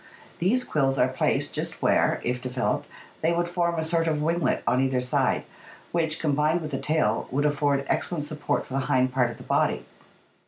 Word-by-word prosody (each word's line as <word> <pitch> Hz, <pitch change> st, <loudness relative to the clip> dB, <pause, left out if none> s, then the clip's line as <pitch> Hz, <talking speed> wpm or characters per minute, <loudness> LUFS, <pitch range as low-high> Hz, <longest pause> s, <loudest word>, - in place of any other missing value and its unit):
These 230 Hz, +9 st, +2 dB
quills 135 Hz, -, +1 dB
are 125 Hz, -, +4 dB
placed 130 Hz, -, 0 dB
just -, -, -3 dB
where, -, -, +3 dB
if 125 Hz, +1 st, -1 dB
developed, 125 Hz, 0 st, -1 dB, 0.3 s
they 165 Hz, +2 st, +2 dB
would 170 Hz, 0 st, 0 dB
form 175 Hz, -1 st, 0 dB
a 160 Hz, -, 0 dB
sort 165 Hz, +1 st, +1 dB
of 155 Hz, -2 st, +1 dB
winglet 160 Hz, -1 st, 0 dB
on 125 Hz, -, +2 dB
either 130 Hz, -1 st, +1 dB
side, 125 Hz, 0 st, +1 dB, 0.5 s
which, 160 Hz, -2 st, 0 dB
combined 150 Hz, +2 st, +1 dB
with 155 Hz, -1 st, -5 dB
the 135 Hz, -, -2 dB
tail, 150 Hz, -8 st, 0 dB
would 145 Hz, +3 st, 0 dB
afford 145 Hz, -1 st, +1 dB
excellent 150 Hz, +1 st, -1 dB
support 150 Hz, -1 st, -2 dB
for -, -, -10 dB
the 135 Hz, -, +1 dB
hind 130 Hz, 0 st, +2 dB
part 125 Hz, -2 st, +2 dB
of 120 Hz, -, -8 dB
the -, -, -11 dB
body. -, -, +1 dB
150 Hz, 195 wpm, -26 LUFS, 130-165 Hz, 0.5 s, are